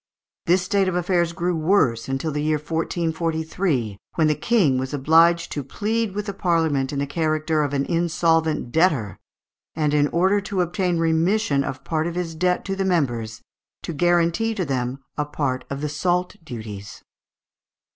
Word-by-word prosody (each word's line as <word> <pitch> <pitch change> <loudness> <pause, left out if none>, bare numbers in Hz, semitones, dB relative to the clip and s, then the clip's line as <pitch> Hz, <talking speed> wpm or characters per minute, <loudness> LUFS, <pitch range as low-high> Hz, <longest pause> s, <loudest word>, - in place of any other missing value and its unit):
This 180 +1 +3
state 195 +1 +1
of 185 - -1
affairs 175 -1 +1
grew 175 +1 -1
worse 155 - +2
until 135 +4 -2
the 150 0 -2
year 155 0 +1
1443, 160 - -2 0.2
when 160 - +3
the 155 - +3
King 160 - +2
was 130 +2 -3
obliged 165 +4 +4
to 145 - -3
plead 215 - -2
with 210 0 -2
the 200 - -4
Parliament 160 -8 +1
in 145 - -4
the 140 - 0
character 155 +1 0
of 145 -2 -1
an 140 -1 0
insolvent 165 -5 +1
debtor, 145 - +1 0.6
and, 150 -2 0
in 145 -1 +3
order 190 +6 +2
to 195 -2 -2
obtain 175 0 0
remission 165 -1 +2
of 135 -1 -5
part 160 0 -1
of 170 - -4
his 175 -2 -3
debt 180 +2 0
to 195 - -2
the 195 - -1
members, 120 - -1 0.4
to 170 - -4
guarantee 175 +7 +2
to 185 -4 -1
them 130 -2 -2 0.2
a 150 - +1
part 135 -3 -2
of 140 0 -4
the 150 - -2
salt 180 +5 0
duties. 110 -7 -8
160 Hz, 170 wpm, -23 LUFS, 140-180 Hz, 0.6 s, obliged